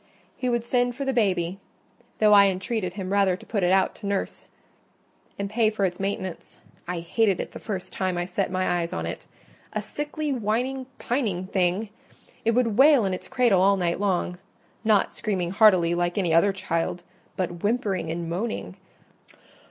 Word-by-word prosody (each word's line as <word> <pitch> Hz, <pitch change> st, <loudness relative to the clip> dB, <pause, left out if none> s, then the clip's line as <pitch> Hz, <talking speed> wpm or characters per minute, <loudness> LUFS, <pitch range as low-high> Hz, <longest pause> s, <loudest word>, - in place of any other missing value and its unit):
He 255 Hz, -, -2 dB
would 240 Hz, -1 st, 0 dB
send 245 Hz, 0 st, +1 dB
for 275 Hz, +1 st, -4 dB
the 270 Hz, -, 0 dB
baby; 190 Hz, -5 st, 0 dB, 0.6 s
though 210 Hz, -1 st, +5 dB
I 200 Hz, -1 st, +8 dB
entreated 190 Hz, 0 st, -2 dB
him 190 Hz, -1 st, -5 dB
rather 195 Hz, -2 st, +3 dB
to -, -, -15 dB
put 210 Hz, -3 st, -2 dB
it 180 Hz, 0 st, +2 dB
out 190 Hz, 0 st, +3 dB
to 205 Hz, -, -7 dB
nurse 200 Hz, -1 st, -3 dB, 0.9 s
and 200 Hz, -, -2 dB
pay 215 Hz, +1 st, +2 dB
for 210 Hz, -2 st, 0 dB
its 180 Hz, -1 st, -3 dB
maintenance. 195 Hz, -2 st, -4 dB, 0.3 s
I 175 Hz, -1 st, -3 dB
hated 195 Hz, +2 st, +1 dB
it -, -, -4 dB
the -, -, -9 dB
first 195 Hz, -4 st, -5 dB
time 185 Hz, -2 st, -1 dB
I 175 Hz, -, -1 dB
set 190 Hz, +2 st, -2 dB
my 185 Hz, -1 st, 0 dB
eyes 170 Hz, 0 st, -3 dB
on -, -, -3 dB
it—a -, -, -8 dB
sickly, 295 Hz, 0 st, -3 dB
whining, 250 Hz, +3 st, -1 dB
pining 215 Hz, -8 st, -1 dB
thing! 185 Hz, +3 st, 0 dB, 0.5 s
It 230 Hz, 0 st, +2 dB
would 235 Hz, -3 st, +1 dB
wail 280 Hz, -5 st, +7 dB
in 190 Hz, -, 0 dB
its 185 Hz, -, -5 dB
cradle 245 Hz, -8 st, +3 dB
all 200 Hz, +1 st, +4 dB
night 175 Hz, -1 st, 0 dB
long—not 195 Hz, +2 st, -1 dB
screaming 185 Hz, -5 st, -2 dB
heartily 185 Hz, -5 st, +5 dB
like 175 Hz, +1 st, -1 dB
any 175 Hz, -5 st, +1 dB
other 170 Hz, +5 st, +5 dB
child, 175 Hz, -2 st, -2 dB, 0.3 s
but 175 Hz, -2 st, -3 dB
whimpering 205 Hz, -6 st, 0 dB
and 170 Hz, +1 st, -3 dB
moaning. 195 Hz, +7 st, -4 dB
195 Hz, 175 wpm, -25 LUFS, 180-225 Hz, 0.9 s, I